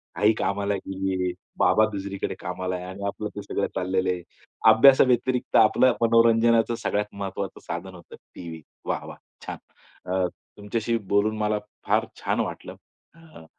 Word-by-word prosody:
आई 105 Hz, +1 st, +4 dB
कामाला 100 Hz, +1 st, 0 dB
गेली 95 Hz, 0 st, -3 dB
आहे, 90 Hz, -, 0 dB, 0.3 s
बाबा 110 Hz, -, +4 dB
दुसरीकडे 100 Hz, -1 st, -4 dB
कामाला 90 Hz, +1 st, -3 dB
आहे 90 Hz, 0 st, -6 dB
आणि 95 Hz, +2 st, -8 dB
आपलं 105 Hz, +1 st, -4 dB
ते 105 Hz, -, -5 dB
सगळं 100 Hz, 0 st, -2 dB
चाललेलं 95 Hz, 0 st, 0 dB
आहे. 90 Hz, -1 st, -2 dB, 0.5 s
अभ्यासाव्यतिरिक्त 125 Hz, +1 st, +4 dB
आपलं 115 Hz, +3 st, +5 dB
मनोरंजनाचं 115 Hz, 0 st, +4 dB
सगळ्यात 105 Hz, 0 st, -1 dB
महत्त्वाचं 100 Hz, -1 st, -5 dB
साधन 90 Hz, +2 st, -5 dB
होतं 85 Hz, -, -13 dB, 0.2 s
टीव्ही. 80 Hz, -2 st, -8 dB, 0.2 s
वाह! -, -, -2 dB
वाह! -, -, -9 dB, 0.3 s
छान! -, -, -5 dB, 0.6 s
अ, 95 Hz, -1 st, +2 dB, 0.3 s
तुमच्याशी 110 Hz, +3 st, -1 dB, 0.2 s
बोलून 110 Hz, +2 st, +2 dB
मला 105 Hz, 0 st, 0 dB, 0.3 s
फार -, -, +3 dB, 0.2 s
छान -, -, 0 dB
वाटलं. -, -, -4 dB, 0.4 s
अ, 160 Hz, -, -15 dB
100 Hz, 145 wpm, -25 LUFS, 95-115 Hz, 0.6 s, आपलं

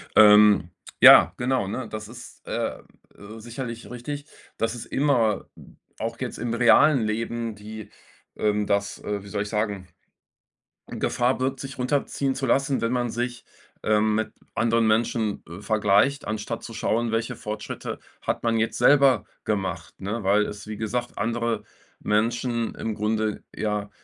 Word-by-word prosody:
Ähm, 105 Hz, -4 st, +7 dB, 0.3 s
ja, -, -, +9 dB
genau, 125 Hz, -4 st, 0 dB
ne? 115 Hz, +6 st, -4 dB
Das 110 Hz, -1 st, -6 dB
ist, 120 Hz, +2 st, -13 dB
äh -, -, -2 dB, 0.4 s
äh, 105 Hz, +2 st, -11 dB
sicherlich 120 Hz, +1 st, -7 dB
richtig. 140 Hz, +4 st, -6 dB, 0.3 s
Das 115 Hz, +1 st, -1 dB
ist 120 Hz, -, -7 dB
immer 125 Hz, -7 st, +1 dB, 0.5 s
auch 115 Hz, +1 st, -3 dB
jetzt 125 Hz, -2 st, -4 dB
im 120 Hz, -1 st, -3 dB
realen 125 Hz, +4 st, +5 dB
Leben 115 Hz, +1 st, -3 dB
die, 105 Hz, 0 st, -9 dB, 0.5 s
ähm, 105 Hz, 0 st, +1 dB
das 100 Hz, 0 st, -1 dB
äh, 100 Hz, -1 st, -3 dB
wie -, -, -12 dB
soll 100 Hz, 0 st, -2 dB
ich 105 Hz, -, -7 dB
sagen, 105 Hz, -4 st, -2 dB, 1.0 s
Gefahr 125 Hz, +1 st, 0 dB
birgt, 130 Hz, +1 st, -1 dB
sich 135 Hz, 0 st, -7 dB
runterziehen 135 Hz, +1 st, 0 dB
zu 135 Hz, 0 st, -2 dB
lassen, 135 Hz, +2 st, +1 dB
wenn 115 Hz, +1 st, 0 dB
man 120 Hz, -2 st, 0 dB
sich, 120 Hz, 0 st, -4 dB, 0.4 s
ähm, 110 Hz, 0 st, +2 dB
mit 110 Hz, +1 st, -1 dB, 0.2 s
anderen 115 Hz, 0 st, +2 dB
Menschen, 110 Hz, -1 st, +1 dB
äh, 85 Hz, +3 st, -9 dB
vergleicht, 110 Hz, +6 st, +2 dB
anstatt 110 Hz, +2 st, -4 dB
zu 115 Hz, -, -8 dB
schauen, 115 Hz, +1 st, 0 dB
welche 115 Hz, +1 st, -1 dB
Fortschritte 105 Hz, 0 st, -6 dB, 0.2 s
hat -, -, -2 dB
man 115 Hz, -1 st, +1 dB
jetzt 110 Hz, 0 st, 0 dB
selber 135 Hz, -7 st, +5 dB, 0.2 s
gemacht, 100 Hz, -3 st, -3 dB
ne? 105 Hz, +3 st, -3 dB
Weil 105 Hz, +2 st, +4 dB
es, 105 Hz, 0 st, -8 dB
wie 110 Hz, 0 st, -6 dB
gesagt, 120 Hz, +3 st, -3 dB
andere 115 Hz, -1 st, -1 dB, 0.4 s
Menschen 115 Hz, +2 st, 0 dB
im 110 Hz, -, -4 dB
Grunde 110 Hz, 0 st, -1 dB
ja, 105 Hz, -1 st, -2 dB
115 Hz, 150 wpm, -25 LUFS, 105-120 Hz, 1.0 s, ja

